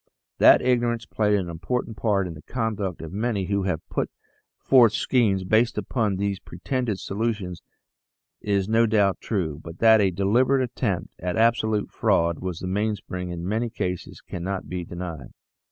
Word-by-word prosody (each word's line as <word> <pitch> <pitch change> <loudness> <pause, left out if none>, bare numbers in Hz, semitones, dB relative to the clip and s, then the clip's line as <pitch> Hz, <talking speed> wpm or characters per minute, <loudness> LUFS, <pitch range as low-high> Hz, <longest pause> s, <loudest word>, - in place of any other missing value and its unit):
That - - +7
ignorance 120 -2 +1
played 105 0 +1
an 95 -3 -2
important 110 +8 -3
part 100 -2 +1
in 85 - -5
the 75 - -11
conduct 105 -7 -3
of 80 +1 -8
many 105 -2 -1
who 100 0 -1
have 90 -5 -2
put - - -2 0.5
forth 120 -5 +5
schemes 105 -7 +2
based 110 +5 +2
upon 105 0 0
these 100 0 -1
pretended 115 +4 -3
solutions 100 -4 -3 0.8
is 100 -2 0
no 115 +1 +3
doubt 105 -3 +2
true, 80 -8 -2
but 85 0 -9
that 110 0 +6
a 100 - +3
deliberate 120 +9 +2
attempt 110 -7 -2
at 90 0 -2
absolute 110 -2 +2
fraud 85 -1 +1
was 90 -3 -5
the 90 - -4
mainspring 95 -2 -2
in 85 0 -5
many 115 +4 -1
cases 90 -6 -4
cannot 95 +2 -5
be 90 -1 -4
denied. 85 -6 -7
100 Hz, 160 wpm, -25 LUFS, 90-115 Hz, 0.8 s, That